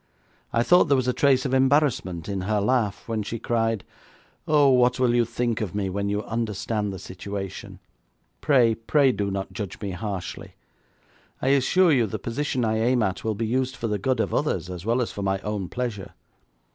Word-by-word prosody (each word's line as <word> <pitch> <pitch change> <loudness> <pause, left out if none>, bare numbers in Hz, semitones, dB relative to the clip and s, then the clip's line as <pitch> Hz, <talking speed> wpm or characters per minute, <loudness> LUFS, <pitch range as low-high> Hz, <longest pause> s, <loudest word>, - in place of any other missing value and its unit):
I 115 0 +2
thought 180 +7 +5
there 140 -3 +3
was 130 -1 0
a 125 - +2
trace 135 -2 +3
of - - -1
embarrassment 130 - +2
in 100 -2 -3
her 105 +3 0
laugh 105 -1 0
when 115 -2 -1
she 110 +3 -4
cried: 115 -2 -1 0.6
'Oh, 150 -2 +5
what 125 -1 +3
will 125 -2 +3
you 120 -1 +3
think 120 0 -2
of 100 -3 -4
me 100 -2 -1
when 100 +1 -2
you 105 +1 -1
understand 110 -2 -2
the 95 - -6
situation? 95 +1 -7 0.6
Pray, 125 -6 +4
pray 130 +5 +2
do 100 -4 -2
not 95 0 -4
judge 100 -4 -6
me 100 -2 -4
harshly. 95 -2 -6 0.8
I 130 - 0
assure 150 +6 +4
you 120 -6 +3
the - - -4
position 125 0 -2
I 110 0 0
aim 120 +1 +2
at 95 -3 -2
will 110 -1 -1
be 115 +3 -2
used 130 +3 -1
for 115 - -3
the 105 -2 -1
good 130 +4 0
of - - -1
others 90 - -1
as 90 +3 -7
well 120 +2 +2
as - - -5
for 100 - -6
my 95 0 0
own 105 -3 -3
pleasure. 120 -6 -4
115 Hz, 200 wpm, -25 LUFS, 100-125 Hz, 0.8 s, thought